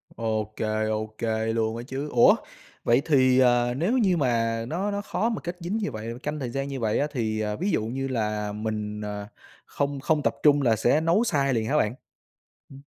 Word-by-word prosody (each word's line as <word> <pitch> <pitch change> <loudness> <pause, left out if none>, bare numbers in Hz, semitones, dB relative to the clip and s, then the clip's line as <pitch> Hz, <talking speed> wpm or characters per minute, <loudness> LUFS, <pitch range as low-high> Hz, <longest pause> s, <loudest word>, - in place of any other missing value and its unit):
Ô 110 -2 -2
kê, 110 0 -1
ô 110 0 -1
kê 110 0 -1
luôn 110 0 0
á 120 - -6
chứ. 140 +3 -4
Ủa? 120 - +6 0.5
Vậy 120 +3 +4
thì, 130 -4 +4
ờ, 120 -1 +4
nếu 190 - +1
như 190 -7 +3
mà 115 -4 0
nó 190 +7 -2
nó 200 0 -2
khó 225 +2 -1
mà 225 - -3
kết 175 0 -5
dính 175 +6 -2
như 205 -9 -2
vậy, 110 0 -5
canh 150 +1 -3
thời 125 -4 -3
gian 135 +3 -3
như 135 -2 -4
vậy 110 -2 0
á, 145 - +1
thì, 110 -5 -1
à, 105 -1 -2
ví 190 - -1
dụ 110 - 0
như 135 +3 -3
là 105 -4 -2
mình, 105 0 -4
ờ, 105 -1 -5 0.4
không 140 -1 -2
không 150 +1 +1
tập - - +1
trung 145 -1 +5
là 120 -4 +3
sẽ 120 +8 +2
nấu 170 +8 +3
sai 140 - +1
liền 110 -2 0
hả 150 - +2
bạn? 110 -3 +1 0.7
Ừm. 135 0 -12
125 Hz, 220 wpm, -26 LUFS, 110-150 Hz, 0.7 s, Ủa